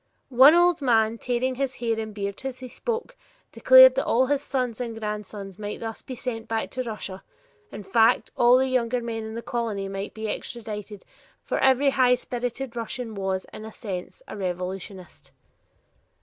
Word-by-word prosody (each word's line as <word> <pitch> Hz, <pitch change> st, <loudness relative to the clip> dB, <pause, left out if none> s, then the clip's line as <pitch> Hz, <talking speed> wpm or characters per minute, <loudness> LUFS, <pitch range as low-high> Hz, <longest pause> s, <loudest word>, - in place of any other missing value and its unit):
One 270 Hz, +5 st, +7 dB
old 350 Hz, -2 st, +4 dB
man, 225 Hz, -3 st, +2 dB
tearing 250 Hz, +1 st, -1 dB
his 270 Hz, 0 st, -2 dB
hair 230 Hz, -2 st, -1 dB
and 220 Hz, -1 st, -4 dB
beard 200 Hz, +2 st, -5 dB
as 265 Hz, -1 st, -4 dB
he 255 Hz, -, -8 dB
spoke, 475 Hz, -, -4 dB, 0.4 s
declared -, -, +8 dB
that -, -, -1 dB
all 255 Hz, +3 st, +3 dB
his 285 Hz, +1 st, 0 dB
sons 250 Hz, -4 st, -2 dB
and 230 Hz, -2 st, -5 dB
grandsons 210 Hz, -2 st, -6 dB
might 205 Hz, 0 st, -5 dB
thus 225 Hz, -1 st, -6 dB
be 255 Hz, -, -8 dB
sent 230 Hz, -2 st, -5 dB
back 225 Hz, -1 st, -2 dB
to 255 Hz, -, -3 dB
Russia; 215 Hz, -5 st, -6 dB, 0.5 s
in 210 Hz, -, -8 dB
fact, 220 Hz, +4 st, +3 dB
all 240 Hz, +1 st, +5 dB
of 255 Hz, -, +4 dB
the -, -, 0 dB
younger 250 Hz, -1 st, 0 dB
men 225 Hz, -1 st, -4 dB
in 220 Hz, 0 st, -7 dB
the 230 Hz, -, -5 dB
colony 220 Hz, -5 st, -3 dB
might 195 Hz, +1 st, -6 dB
be 220 Hz, 0 st, -4 dB
extradited, 210 Hz, -2 st, -6 dB, 0.4 s
for -, -, -2 dB
every 265 Hz, +1 st, +4 dB
high 255 Hz, -2 st, +4 dB
spirited 245 Hz, +1 st, -5 dB
young 235 Hz, -, -3 dB
Russian 230 Hz, 0 st, -5 dB
was, 190 Hz, -2 st, -2 dB
in -, -, -8 dB
a 220 Hz, -, -8 dB
sense, 200 Hz, -, -7 dB
a -, -, -7 dB
revolutionist. 185 Hz, 0 st, -6 dB
230 Hz, 185 wpm, -25 LUFS, 210-255 Hz, 0.5 s, declared